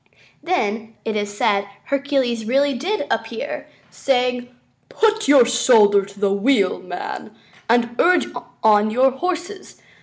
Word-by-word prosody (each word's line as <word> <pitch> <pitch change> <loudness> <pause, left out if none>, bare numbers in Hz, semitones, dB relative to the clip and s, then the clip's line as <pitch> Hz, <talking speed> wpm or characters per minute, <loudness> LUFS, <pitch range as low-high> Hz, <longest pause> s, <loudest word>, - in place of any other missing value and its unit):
Then, 225 - -2
it 220 - -2
is 205 -1 -4
said, 200 -2 +1 0.2
Hercules 270 -5 -1
really 275 +4 +1
did 360 - -2
appear, - - -4 0.2
saying: 250 -2 -1 0.4
"Put 440 0 +1
your 275 -4 +6
shoulder 225 -5 +4
to 200 0 -15
the 200 -1 +1
wheel, 200 -1 +1
man, 180 +3 -7 0.3
and 235 0 +1
urge 360 +1 +3 0.4
on 215 -1 +4
your 255 +4 +3
horses. 360 +6 -5
245 Hz, 125 wpm, -20 LUFS, 210-280 Hz, 0.4 s, your